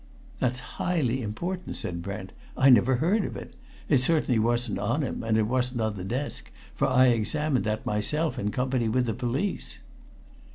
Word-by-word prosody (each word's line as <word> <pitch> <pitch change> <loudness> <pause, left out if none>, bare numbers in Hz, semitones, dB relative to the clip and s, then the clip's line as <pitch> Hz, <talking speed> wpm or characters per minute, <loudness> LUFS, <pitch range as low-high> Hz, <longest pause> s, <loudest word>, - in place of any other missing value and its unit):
"That's 125 0 0 0.2
highly 135 -8 +1
important!" 175 - -4
said 85 -1 -4
Brent. 95 +1 -6 0.3
"I 135 0 +6
never 125 +2 +5
heard 180 - +2
of - - -4
it. - - -9 0.3
It 140 - +4
certainly 130 -3 +2
wasn't 120 -2 +1
on 115 +9 0
him, 130 - -3
and 110 -1 +1
it 110 - +3
wasn't 125 +1 0
on 110 -1 -1
the 95 - -6
desk, 125 +9 -4 0.2
for - - +1
I 130 0 +5
examined 130 +5 +1
that 110 0 -2
myself, 150 +10 0
in 105 - -1
company 125 0 0
with 125 +2 +1
the 115 - -1
police." 125 - -2
125 Hz, 175 wpm, -27 LUFS, 110-135 Hz, 0.3 s, I